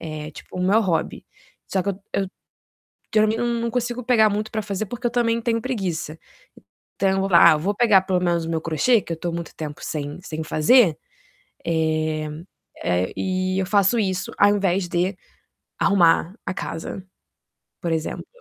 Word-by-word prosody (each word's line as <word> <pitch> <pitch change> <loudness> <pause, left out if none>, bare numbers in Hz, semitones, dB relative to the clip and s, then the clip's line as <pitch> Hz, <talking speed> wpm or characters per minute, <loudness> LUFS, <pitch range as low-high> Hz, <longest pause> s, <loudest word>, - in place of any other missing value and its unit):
é 155 -2 -6
tipo 160 - -12
o 180 - -1
meu 200 +4 +4
hobby. 180 -7 -1 0.4
Só 190 - -1
que 200 - -1
eu 195 - -8
eu - - +1 0.9
geralmente 215 +1 +3
não 240 - 0
não 235 0 -1
consigo 245 0 -2
pegar 220 -4 +4
muito 210 +1 -2
para 215 -1 -2
fazer 200 +1 -3
porque 245 +4 -4
eu - - +1
também 235 -1 +1
tenho 230 -1 0
preguiça. 185 - -3 0.8
Então 195 - +2
eu 190 0 +1
vou: 195 0 -1
"Ah, 155 - +8
vou 195 +7 -1
pegar 205 -5 +5
pelo 185 -1 0
menos 170 -2 +1
o 165 - -4
meu 165 -1 -1
crochê 165 +9 +2
que 170 - -6
eu - - 0
estou 170 +1 -4
muito 170 0 -6
tempo 150 -2 -7
sem 145 +1 -4
sem 160 -3 -5
fazer". 165 - +4 0.7
Eh, 155 -1 0 0.6
eh, 90 +1 0
e 185 0 -1
eu 190 - 0
faço 200 +3 +3
isso 190 -3 -1
ao 205 - +6
invés 190 -2 0
de 180 +3 0 0.6
arrumar 180 -2 +3
a 190 - -1
casa, 165 +1 -5 0.8
por 170 -3 -2
exemplo. 160 0 -3
185 Hz, 180 wpm, -23 LUFS, 165-215 Hz, 0.9 s, Ah